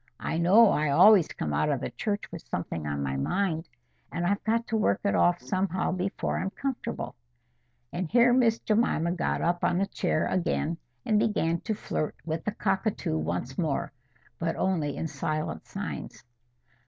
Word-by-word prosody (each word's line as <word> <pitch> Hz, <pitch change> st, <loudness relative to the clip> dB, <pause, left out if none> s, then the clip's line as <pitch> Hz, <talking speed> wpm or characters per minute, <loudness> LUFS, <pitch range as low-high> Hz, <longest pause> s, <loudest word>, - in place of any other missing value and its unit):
I 160 Hz, -, -2 dB
know 200 Hz, +6 st, +6 dB
I 150 Hz, 0 st, +1 dB
always 190 Hz, +5 st, +7 dB
come 75 Hz, -1 st, -4 dB
out 75 Hz, -, +1 dB
of 140 Hz, -3 st, +1 dB
the -, -, -3 dB
church 205 Hz, -2 st, -2 dB
with 170 Hz, -1 st, -7 dB
something 80 Hz, -3 st, -4 dB
on 70 Hz, -1 st, -2 dB
my 70 Hz, -1 st, -2 dB
mind; 165 Hz, -, -1 dB, 0.4 s
and 175 Hz, -, -2 dB
I've 200 Hz, +3 st, 0 dB
got 230 Hz, +1 st, +1 dB
to 225 Hz, -, 0 dB
work 220 Hz, -, +2 dB
it 200 Hz, -, +1 dB
off 175 Hz, 0 st, +3 dB
somehow 185 Hz, -1 st, -1 dB
before 185 Hz, +2 st, -2 dB
I'm 195 Hz, -, -1 dB
comfortable." 270 Hz, +5 st, -4 dB, 0.8 s
And 175 Hz, -1 st, -2 dB
here 245 Hz, +1 st, +5 dB
Miss 235 Hz, -3 st, +4 dB
Jemima 210 Hz, -8 st, +1 dB
got 175 Hz, -, -1 dB
up 175 Hz, +1 st, 0 dB
on 175 Hz, -, +2 dB
the 195 Hz, -, +2 dB
chair 175 Hz, -5 st, 0 dB
again, 170 Hz, -2 st, -1 dB, 0.3 s
and 215 Hz, -1 st, +3 dB
began 190 Hz, -7 st, +1 dB
to 215 Hz, -, -2 dB
flirt 155 Hz, -6 st, -3 dB
with 160 Hz, 0 st, -3 dB
the 210 Hz, -, 0 dB
cockatoo 195 Hz, -, -1 dB
once 85 Hz, +11 st, -3 dB
more, 155 Hz, -5 st, -1 dB, 0.5 s
but 165 Hz, 0 st, -1 dB
only 165 Hz, -6 st, 0 dB
in -, -, -2 dB
silent 155 Hz, -, -3 dB
signs. -, -, -6 dB
175 Hz, 175 wpm, -28 LUFS, 155-210 Hz, 0.8 s, always